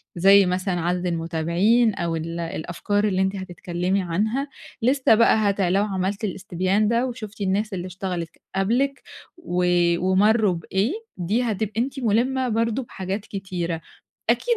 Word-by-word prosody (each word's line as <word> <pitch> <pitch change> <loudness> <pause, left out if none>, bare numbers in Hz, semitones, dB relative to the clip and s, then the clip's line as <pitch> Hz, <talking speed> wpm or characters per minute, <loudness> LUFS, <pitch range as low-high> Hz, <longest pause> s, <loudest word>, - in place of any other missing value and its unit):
زي 195 +3 +6
مثلًا 180 0 -1
عدد 180 +2 -1
المتابعين 170 +7 +2
أو 170 -1 -2
ال 165 +1 -4
الأفكار 175 +5 -2
اللي 190 -2 +1
أنتِ 190 +1 0
هتتكلمي 180 0 -2
عنها 215 +11 -1 0.3
لسه 255 0 +4
بقى 230 0 +5
هتع 195 -2 +1
لو 195 +3 +3
عملتِ 195 +2 -2
الإستبيان 190 +1 0
ده 235 +2 +2
وشُفتِ 220 -4 -8
الناس 200 +2 0
اللي 180 -1 -4
اشتغلِت 180 -2 -4
ك - - -31
قبلِك 245 +8 0 0.3
و 180 - -1 0.3
ومرّوا 200 +2 +3
بإيه 190 - -1 0.2
دي 200 +7 0
هتبقي 220 -1 -1
أنتِ 270 +2 -3
مُلِمة 250 +3 +1
برضه 230 +3 0
بحاجات 195 -1 -5
كتيرة 180 -4 -4 0.5
أكيد 475 -1 +2
195 Hz, 145 wpm, -23 LUFS, 180-220 Hz, 0.5 s, زي